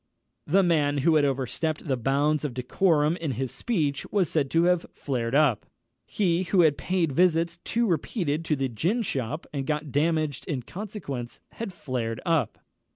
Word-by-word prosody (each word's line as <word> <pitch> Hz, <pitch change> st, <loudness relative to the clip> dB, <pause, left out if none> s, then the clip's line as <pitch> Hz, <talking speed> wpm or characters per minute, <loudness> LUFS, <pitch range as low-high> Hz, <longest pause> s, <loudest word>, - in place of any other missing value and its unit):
The 190 Hz, +5 st, +4 dB
man 150 Hz, -5 st, +2 dB
who 165 Hz, -, +5 dB
had 150 Hz, -2 st, +4 dB
overstepped 140 Hz, +4 st, -2 dB
the 135 Hz, -, +1 dB
bounds 140 Hz, +5 st, +1 dB
of 140 Hz, -5 st, -3 dB
decorum 150 Hz, +4 st, +2 dB
in 160 Hz, -6 st, -3 dB
his 130 Hz, +1 st, -3 dB
speech 155 Hz, -, -1 dB
was 190 Hz, -6 st, +1 dB
said 145 Hz, -4 st, +1 dB
to 165 Hz, +3 st, +3 dB
have 180 Hz, -1 st, +2 dB
flared 125 Hz, -3 st, -2 dB
up; 145 Hz, -8 st, +3 dB, 0.4 s
he 180 Hz, -4 st, +1 dB
who 185 Hz, 0 st, +3 dB
had 155 Hz, -3 st, +4 dB
paid 180 Hz, -3 st, 0 dB
visits 170 Hz, +2 st, +2 dB
too 235 Hz, +6 st, 0 dB
repeated 165 Hz, -, -1 dB
to 155 Hz, -, +1 dB
the 135 Hz, -1 st, -1 dB
gin 170 Hz, -, 0 dB
shop, 140 Hz, -, -3 dB
and 135 Hz, -2 st, -3 dB
got 150 Hz, -1 st, -2 dB
damaged 155 Hz, -1 st, 0 dB
in 135 Hz, -6 st, -2 dB
consequence, 175 Hz, -, -6 dB
had 230 Hz, -4 st, -6 dB
flared 125 Hz, -9 st, -3 dB
up. 165 Hz, -3 st, +1 dB
155 Hz, 170 wpm, -26 LUFS, 135-170 Hz, 0.4 s, who